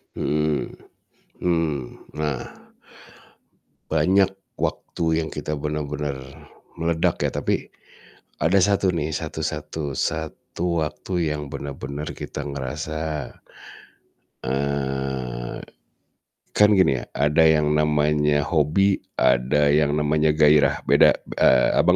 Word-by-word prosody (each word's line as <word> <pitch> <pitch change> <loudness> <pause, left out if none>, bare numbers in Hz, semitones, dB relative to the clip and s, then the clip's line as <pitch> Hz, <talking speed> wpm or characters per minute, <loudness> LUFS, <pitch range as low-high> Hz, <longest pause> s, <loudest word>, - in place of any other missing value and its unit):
Mhm, 75 +1 0 0.7
mmm, 80 -5 0 0.4
nah 75 -4 -2 1.5
Banyak 95 +5 +1
waktu 80 -1 -1
yang 80 - -6
kita 75 +1 -4
benar-benar 75 -1 -3 0.6
meledak 85 0 0
ya, - - +1
tapi - - -2 0.7
ada 80 +6 +3
1 100 0 +3
nih, 80 -3 -1
satu 80 0 -4
satu 75 -1 -4
satu 85 +5 -2
waktu 80 +2 -2
yang 75 -2 -7
benar-benar 70 +1 -5
kita - - -6
ngerasa 75 +3 -4 1.2
eee, 65 -3 -2 0.9
kan 105 0 +5
gini 70 -9 +3
ya, - - -8
ada 75 +3 +3
yang 75 -1 +3
namanya 75 -1 +2
hobi, 85 +6 +2 0.2
ada 65 +4 +3
yang 75 0 +3
namanya 75 0 +2
gairah, 75 -2 +4
beda, - - +5
b - - -14
eee, 65 -1 +5
Abang, - - +4
75 Hz, 105 wpm, -23 LUFS, 70-80 Hz, 1.5 s, kan